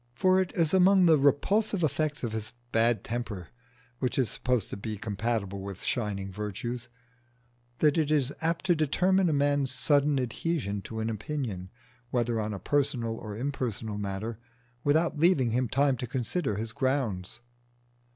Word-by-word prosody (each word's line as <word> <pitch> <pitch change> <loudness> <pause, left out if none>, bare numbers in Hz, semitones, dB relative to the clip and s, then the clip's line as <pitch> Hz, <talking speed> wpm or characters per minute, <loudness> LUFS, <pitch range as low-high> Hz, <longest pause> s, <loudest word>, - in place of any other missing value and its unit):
For 185 +6 +4
it 185 - -2
is 165 -1 +2
among 190 0 +6
the 165 -2 +7
repulsive 195 +8 +2
effects 155 -1 0
of 120 - -1
this 110 +1 -5 0.2
bad 115 -1 +2
temper, 110 -7 -4 0.5
which 125 - -1
is 130 -4 +2
supposed 125 -5 -1
to - - -3
be 105 +1 -5
compatible 100 -1 -2
with 100 -1 -7
shining 100 -5 -2
virtues, 115 +5 -5 0.9
that 150 +1 +4
it 155 -2 +1
is 145 -3 +2
apt 165 +1 -1
to 180 - +5
determine 180 +5 +2
a - - +2
man's 145 -1 +2
sudden 145 +2 +2
adhesion 125 - -2
to 110 -1 -4
an 110 - -1
opinion, 110 -5 -4 0.4
whether 120 -2 0
on 105 0 -2
a 100 - -3
personal 125 - 0
or 105 -2 -7
impersonal 115 -5 -3
matter, 105 +3 -4 0.4
without 155 +1 +2
leaving 150 -8 +4
him 125 +1 +1
time 135 +1 +2
to 125 - -4
consider 130 - -1
his 110 +2 -3
grounds. 120 -6 -1
125 Hz, 160 wpm, -29 LUFS, 110-150 Hz, 0.9 s, the